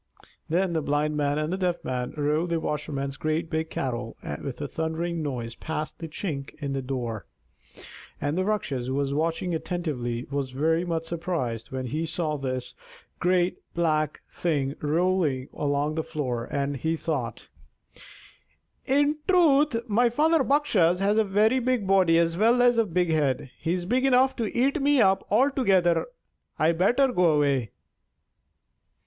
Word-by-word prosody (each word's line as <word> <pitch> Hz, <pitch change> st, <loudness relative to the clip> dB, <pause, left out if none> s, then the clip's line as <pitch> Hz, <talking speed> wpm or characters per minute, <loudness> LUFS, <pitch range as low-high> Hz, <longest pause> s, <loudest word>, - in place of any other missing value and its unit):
Then 175 Hz, +2 st, +1 dB
the 160 Hz, -, 0 dB
Blind 150 Hz, +1 st, 0 dB
Man 145 Hz, -1 st, 0 dB
and 155 Hz, +3 st, -1 dB
the 190 Hz, -, -2 dB
Deaf 180 Hz, -2 st, -1 dB
Man 125 Hz, -1 st, -3 dB
rolled 150 Hz, +4 st, 0 dB
the 165 Hz, -1 st, 0 dB
washerman's 140 Hz, -3 st, -3 dB
great 160 Hz, +2 st, -2 dB
big 160 Hz, 0 st, -1 dB
kettle 120 Hz, -5 st, -4 dB, 0.3 s
with -, -, -5 dB
a -, -, -3 dB
thundering 160 Hz, +1 st, -2 dB
noise 125 Hz, -6 st, -4 dB
past 155 Hz, +4 st, -5 dB
the 165 Hz, -, -5 dB
chink 150 Hz, -4 st, -5 dB
in 140 Hz, -3 st, -4 dB
the 135 Hz, -, -2 dB
door, 125 Hz, -5 st, -4 dB, 0.9 s
and 145 Hz, +1 st, -1 dB
the 185 Hz, -, +1 dB
Rakshas, 145 Hz, -12 st, -2 dB
who 130 Hz, -, -2 dB
was 140 Hz, 0 st, 0 dB
watching 165 Hz, +4 st, -1 dB
attentively, 145 Hz, -9 st, -3 dB
was 140 Hz, -2 st, -2 dB
very 160 Hz, +6 st, +1 dB
much 165 Hz, -2 st, -2 dB
surprised 165 Hz, -10 st, -3 dB
when 130 Hz, -1 st, -3 dB
he 155 Hz, +6 st, -2 dB
saw 160 Hz, -1 st, -2 dB
this 130 Hz, -3 st, -4 dB, 0.5 s
great 180 Hz, 0 st, +2 dB, 0.2 s
black 155 Hz, -3 st, 0 dB
thing 145 Hz, -5 st, -1 dB
rolling 155 Hz, -4 st, +1 dB
along 145 Hz, +1 st, 0 dB
the 160 Hz, -, -1 dB
floor, 125 Hz, -8 st, -3 dB
and 140 Hz, +1 st, -2 dB
he 160 Hz, +4 st, -1 dB
thought: -, -, -3 dB, 1.4 s
"In 290 Hz, +2 st, +3 dB
truth, 295 Hz, -9 st, +3 dB
my 235 Hz, +3 st, +3 dB
father 310 Hz, +5 st, +3 dB
Bakshas 215 Hz, -, +2 dB
has 205 Hz, +2 st, +2 dB
a -, -, +5 dB
very 215 Hz, +5 st, +3 dB
big 250 Hz, -4 st, 0 dB
body 190 Hz, -4 st, +4 dB
as 165 Hz, +1 st, +1 dB
well 235 Hz, +3 st, +4 dB
as 245 Hz, -1 st, +4 dB
a 230 Hz, -, +3 dB
big 175 Hz, -1 st, +1 dB
head. 140 Hz, -4 st, 0 dB
He's 175 Hz, +2 st, -1 dB
big 255 Hz, +7 st, +1 dB
enough 260 Hz, +1 st, +4 dB
to 230 Hz, -2 st, -3 dB
eat 275 Hz, +5 st, +2 dB
me 285 Hz, 0 st, +3 dB
up 190 Hz, -3 st, +4 dB
altogether. 200 Hz, -8 st, +3 dB, 0.5 s
I'd 160 Hz, +2 st, +2 dB
better 245 Hz, +8 st, +4 dB
go 180 Hz, -9 st, +3 dB
away." 140 Hz, -6 st, +1 dB
165 Hz, 160 wpm, -26 LUFS, 145-195 Hz, 1.4 s, a